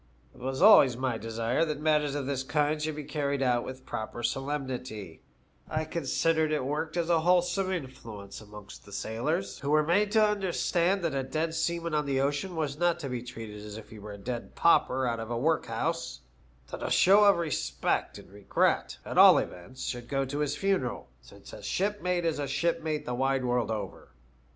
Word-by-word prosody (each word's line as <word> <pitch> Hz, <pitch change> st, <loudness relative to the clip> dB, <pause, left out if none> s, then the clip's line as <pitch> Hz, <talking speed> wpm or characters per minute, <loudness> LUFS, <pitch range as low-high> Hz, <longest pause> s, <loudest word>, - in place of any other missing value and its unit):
It -, -, -17 dB
was 130 Hz, +5 st, -2 dB
always 140 Hz, -, +7 dB
my 125 Hz, -3 st, -1 dB
desire 115 Hz, +5 st, -1 dB
that 150 Hz, -3 st, -2 dB
matters 150 Hz, -2 st, +1 dB
of 145 Hz, -2 st, -2 dB
this 135 Hz, -1 st, -2 dB
kind 150 Hz, +2 st, 0 dB
should 155 Hz, 0 st, -2 dB
be 150 Hz, -, -5 dB
carried 140 Hz, -1 st, -1 dB
out 120 Hz, -2 st, +2 dB
with 130 Hz, 0 st, -8 dB
proper 110 Hz, +2 st, -5 dB
solemnity* 130 Hz, -, -4 dB, 0.5 s
I 155 Hz, 0 st, -1 dB
considered 160 Hz, -1 st, 0 dB
it 150 Hz, -4 st, 0 dB
worked 155 Hz, +4 st, -2 dB
as 170 Hz, -1 st, 0 dB
a 170 Hz, -1 st, +3 dB
whole 175 Hz, +2 st, +4 dB
some 185 Hz, +2 st, -1 dB
influence 115 Hz, -, -7 dB
amongst 105 Hz, -1 st, -12 dB
the 100 Hz, -, -15 dB
sailors, 100 Hz, -1 st, -2 dB
who 140 Hz, -, -4 dB
were 155 Hz, +1 st, +4 dB
made 200 Hz, +5 st, +2 dB
to 220 Hz, -1 st, +6 dB
understand 190 Hz, -2 st, +1 dB
that 165 Hz, -4 st, 0 dB
a 135 Hz, -, 0 dB
dead 155 Hz, +5 st, -2 dB
seaman 170 Hz, 0 st, -1 dB
on 150 Hz, -1 st, 0 dB
the 135 Hz, -1 st, +1 dB
ocean 145 Hz, +7 st, -1 dB
was 150 Hz, -2 st, -2 dB
not 175 Hz, -1 st, +2 dB
to 140 Hz, -, -4 dB
be 125 Hz, -1 st, -3 dB
treated 110 Hz, -4 st, -8 dB
as 105 Hz, 0 st, -8 dB
if 110 Hz, -, -12 dB
he 110 Hz, -, -10 dB
were 105 Hz, 0 st, -8 dB
a -, -, -9 dB
dead 120 Hz, +4 st, -6 dB
pauper 130 Hz, -6 st, +3 dB
out 120 Hz, -2 st, -1 dB
of 115 Hz, 0 st, -6 dB
a 120 Hz, -, -2 dB
workhouse; 130 Hz, -, -1 dB, 0.5 s
that -, -, -6 dB
a -, -, -2 dB
show 200 Hz, +3 st, +6 dB
of 200 Hz, -2 st, +6 dB
respect 165 Hz, -4 st, -1 dB
and -, -, -14 dB
regret, 100 Hz, 0 st, 0 dB
at -, -, 0 dB
all -, -, +9 dB
events, 125 Hz, +9 st, -5 dB
should 120 Hz, -1 st, -4 dB
go 135 Hz, 0 st, 0 dB
to 145 Hz, +2 st, -4 dB
his 145 Hz, -1 st, -1 dB
funeral, 155 Hz, -, -1 dB
since 60 Hz, -, -15 dB
a -, -, -9 dB
shipmate 180 Hz, -3 st, -1 dB
is 160 Hz, -2 st, 0 dB
a 145 Hz, -, -2 dB
shipmate 155 Hz, +2 st, -1 dB
the 125 Hz, -, -3 dB
wide 135 Hz, +1 st, 0 dB
world 125 Hz, -2 st, 0 dB
over. 105 Hz, -4 st, -5 dB
140 Hz, 200 wpm, -29 LUFS, 120-165 Hz, 0.5 s, all